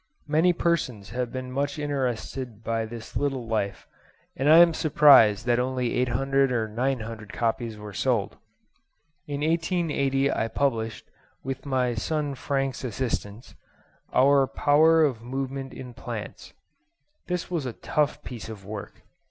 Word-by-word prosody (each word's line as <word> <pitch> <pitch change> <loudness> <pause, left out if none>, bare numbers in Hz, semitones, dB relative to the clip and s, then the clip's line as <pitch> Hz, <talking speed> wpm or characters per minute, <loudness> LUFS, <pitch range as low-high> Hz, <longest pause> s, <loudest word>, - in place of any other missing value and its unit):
Many 160 +4 +3
persons 145 - -1
have 125 0 -3
been 130 0 -5
much 140 +2 -2
interested 130 -5 -3
by 115 0 -1
this 115 0 -9
little 135 -4 -1
life, 105 -4 -2 0.5
and 135 +3 +1
I 160 - +9
am 170 -1 +7
surprised 135 -9 +6
that 120 0 +2
only 125 -1 -1
800 135 +2 +1
or 115 -3 0
900 115 -2 -3
copies 115 -1 -2
were 105 -1 -9
sold. 80 - 0 0.9
In 145 -1 -4
1880 155 -4 +1
I 115 - 0
published, 115 -3 -1 0.4
with 135 +2 -5
[my 130 -2 +1
son] 145 +5 -2
Frank's 135 0 -2
assistance, 115 -3 -4 0.6
our 135 +1 +4
'Power 160 +4 +4
of 125 -6 -2
Movement 135 +2 -4
in 125 -2 -9
Plants.' - - -7 0.7
This 180 0 -3
was 160 -7 -1
a 120 - -4
tough 150 +4 -1
piece 120 -3 -7
of 100 -3 -9
work. 105 0 -8
130 Hz, 135 wpm, -26 LUFS, 115-145 Hz, 0.9 s, I